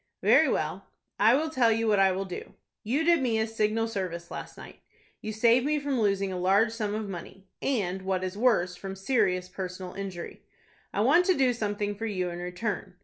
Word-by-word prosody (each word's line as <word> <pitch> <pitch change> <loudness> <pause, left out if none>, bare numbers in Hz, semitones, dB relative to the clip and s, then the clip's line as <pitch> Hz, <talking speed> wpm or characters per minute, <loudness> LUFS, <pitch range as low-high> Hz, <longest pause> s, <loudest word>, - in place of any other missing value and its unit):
"Very - - +5
well, - - -2 0.3
I 220 +4 +6
will 310 +3 0
tell 245 -6 +3
you 225 0 +1
what 210 -2 +3
I 195 -1 +5
will 190 +1 -2
do. 180 -2 -8 0.3
You 265 +9 0
did 340 -2 +4
me 235 -4 +1
a 220 - +1
signal 225 0 0
service 180 -5 -5
last - - -7
night. - - -12 0.4
You 215 - -4
saved 235 +3 +4
me 300 +2 +1
from 280 -4 -1
losing 195 -2 +1
a 180 - -3
large 200 +5 +3
sum 215 -2 -3
of 215 -1 -3
money, 190 +1 -8 0.2
and, 190 -8 -1
what 190 -1 -1
is 185 +1 -3
worse, 205 -6 +2
from 195 +1 -7
serious 195 -4 +1
personal 180 0 -6
injury. 190 -3 -7 0.5
I - - -1
want 360 +1 +5
to 370 - +3
do 260 -2 +3
some 210 -3 -2
thing 205 0 -2
for 225 +3 -4
you 185 -4 -2
in 175 - -6
return. 180 +1 -4
205 Hz, 210 wpm, -28 LUFS, 185-230 Hz, 0.5 s, I